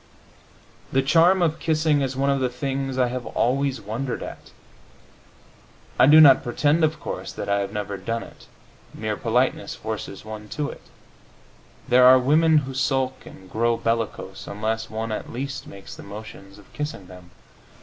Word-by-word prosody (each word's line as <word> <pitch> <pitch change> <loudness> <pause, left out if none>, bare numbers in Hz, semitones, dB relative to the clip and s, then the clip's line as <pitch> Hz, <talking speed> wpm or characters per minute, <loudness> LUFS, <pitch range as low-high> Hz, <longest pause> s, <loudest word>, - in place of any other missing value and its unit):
The 135 0 +2
charm 175 +6 +4
of 160 -1 0
kissing 155 -2 +1
is 135 -1 -2
one 140 +1 +2
of 140 - +1
the 130 -1 0
things 135 +1 -3
I 125 -1 +2
have 125 0 -5
always 135 +1 0
wondered 115 +5 -4
at. - - -9 1.5
I - - +7
do 155 +2 +8
not 140 -4 +8
pretend, 145 +6 +1
of 155 -1 +1
course, - - -6
that - - -6
I 100 0 +1
have 100 0 -3
never 105 -1 -4
done 115 +5 -3
it; - - -15 0.5
mere 110 -1 -3
politeness 120 -2 0
forces 110 -2 -6
one 105 -1 -8
to 150 -1 -1
it; - - -13 1.1
there 125 +1 +6
are 130 0 +9
women 155 +5 +4
who 135 - -6
sulk 130 -1 -1
and 95 - -13
grow 115 +4 0
bellicose 115 -1 -3
unless 110 +2 -3
one 110 +1 -4
at 110 - -5
least 135 +3 -5
makes 100 0 -11
the - - -11
motions 100 -1 -11
of 105 - -19
kissing 150 -10 -5
them. 90 -1 -14
125 Hz, 170 wpm, -23 LUFS, 110-140 Hz, 1.5 s, are